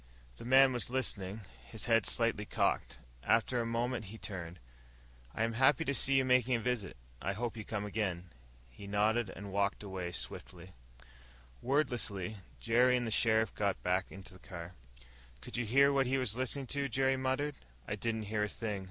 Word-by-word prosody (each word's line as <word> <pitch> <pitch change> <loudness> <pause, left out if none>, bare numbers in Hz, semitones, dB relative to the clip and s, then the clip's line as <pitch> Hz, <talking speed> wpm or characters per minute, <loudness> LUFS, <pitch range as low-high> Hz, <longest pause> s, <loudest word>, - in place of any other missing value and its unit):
The - - -9
man 130 +1 +6
was 120 -1 0
listening, 110 -5 -2 0.2
his 80 - -2
head 115 -3 +3
slightly 115 -3 +1
cocked. - - 0 0.2
After 115 - +2
a 115 - -2
moment 120 0 -1
he 105 +4 -9
turned. 90 -5 -6 0.8
"I 115 - 0
am 115 0 0
happy 135 +6 +4
to 140 - 0
see 135 0 +3
you 135 -1 +4
making 125 -1 +3
a - - 0
visit. 115 - -2 0.2
I 100 - -1
hope 115 +4 -3
you 110 - -6
come 105 -1 -3
again." 95 -5 -3 0.4
He 100 +10 -11
nodded 105 +2 +1
and 100 +1 -8
walked 100 +1 0 0.3
swiftly 85 +1 -5
away. 90 +1 -14 0.9
Wordlessly, 120 -8 0 0.2
Jerry 125 +2 +4
and 120 - -1
the 115 - -3
sheriff 110 0 +3
got 100 -2 -1
back 90 +1 +1
in 95 - -9
the 95 -1 -11
car. 85 -1 -8 0.7
"Could - - -8
you 120 - -1
hear 140 +5 +5
what 135 -2 +2
he 135 +2 +1
was 125 -5 0
listening 130 +2 -2
to?" 140 -1 -1
Jerry 130 +2 +2
muttered. 130 +3 -1 0.3
"I - - -2
didn't 110 +1 -1
hear 105 0 -1
a - - -5
thing." 105 -3 -3
115 Hz, 185 wpm, -33 LUFS, 100-125 Hz, 0.9 s, man